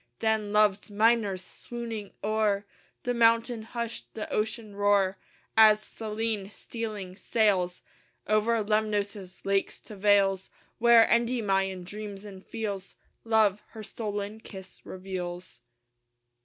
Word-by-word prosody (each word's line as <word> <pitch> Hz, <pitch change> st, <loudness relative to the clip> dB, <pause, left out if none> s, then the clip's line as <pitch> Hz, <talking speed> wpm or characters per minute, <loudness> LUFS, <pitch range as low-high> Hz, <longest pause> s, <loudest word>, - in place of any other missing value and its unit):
Then 220 Hz, -2 st, 0 dB
Love's 210 Hz, -1 st, +3 dB
minors, 210 Hz, -3 st, +2 dB
swooning 230 Hz, -1 st, -7 dB
o'er 210 Hz, -1 st, +1 dB, 0.4 s
The 245 Hz, -, 0 dB
mountain 230 Hz, 0 st, +3 dB
hush, 235 Hz, +1 st, -5 dB
the 220 Hz, -, -4 dB
ocean 215 Hz, -1 st, -2 dB
roar, 200 Hz, -2 st, +2 dB, 0.4 s
As 215 Hz, -1 st, +7 dB
Selene, 215 Hz, -2 st, -3 dB
stealing, 210 Hz, -4 st, -6 dB
sails 195 Hz, -4 st, +1 dB, 0.4 s
Over 215 Hz, +1 st, +2 dB
Lemnos' 205 Hz, -3 st, -1 dB
lakes 195 Hz, 0 st, 0 dB
to 215 Hz, -, -11 dB
vales 195 Hz, -1 st, +3 dB, 0.3 s
Where 235 Hz, -1 st, +7 dB
Endymion 195 Hz, -6 st, +1 dB
dreams 205 Hz, +1 st, -8 dB
and 195 Hz, -2 st, -10 dB
feels 200 Hz, -3 st, -5 dB, 0.3 s
Love 215 Hz, -3 st, +3 dB
her 220 Hz, -2 st, -8 dB
stolen 210 Hz, -1 st, -4 dB
kiss 190 Hz, -4 st, -11 dB
reveals. 185 Hz, -5 st, -6 dB
210 Hz, 110 wpm, -28 LUFS, 195-225 Hz, 0.4 s, As